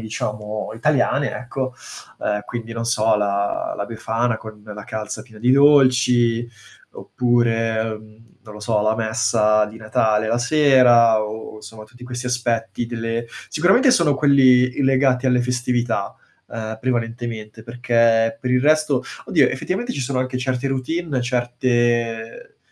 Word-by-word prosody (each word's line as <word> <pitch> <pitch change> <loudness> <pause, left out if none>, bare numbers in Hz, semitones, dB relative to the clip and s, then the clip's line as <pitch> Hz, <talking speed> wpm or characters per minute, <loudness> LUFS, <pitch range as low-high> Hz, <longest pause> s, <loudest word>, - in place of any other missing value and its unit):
diciamo, 105 -1 -5
italiane, 140 +1 0
ecco, 130 0 -5 0.5
uhm, 105 0 -1
quindi 115 -1 -6
non 115 0 -4
so, 110 -2 +2
la 100 -1 -1
la 100 - -3
befana 115 +1 -2
con 110 -1 -12
la 105 -1 -9
calza 110 -1 -6
piena 110 -2 -15
di 120 +2 +2
dolci 125 -4 +4 0.4
oppure, 115 -2 0
uhm, 110 0 -8 0.2
non 110 -2 -13
lo 105 - -11
so, 105 -1 0
la 110 +1 +1
messa 110 -1 +1
di 110 - -11
Natale 110 0 0
la 120 +1 0
sera, 125 -5 +4
o 110 0 -7
somma 110 0 -11
tutti 120 +3 -15
questi 125 0 -6
aspetti 120 -1 -2
delle 115 0 -4 0.2
sicuramente 190 - +3
sono 170 - +3
quelli 130 -3 +4
i - - +1
legati 130 -1 +2
alle 125 -1 +3
festività, 120 -4 -2 0.3
uhm, 110 -1 -6
prevalentemente, 115 -3 -4
perché 115 -1 +1
per 125 - -3
il 125 - +3
resto 150 -2 +2 0.2
Oddio, 145 -7 +3
effettivamente 200 - -3
ci - - -4
sono 130 0 -2
anche 130 0 -3
certe 130 +1 -2
routine, 135 +2 -2
certe 120 -2 -1
120 Hz, 145 wpm, -20 LUFS, 110-130 Hz, 0.5 s, dolci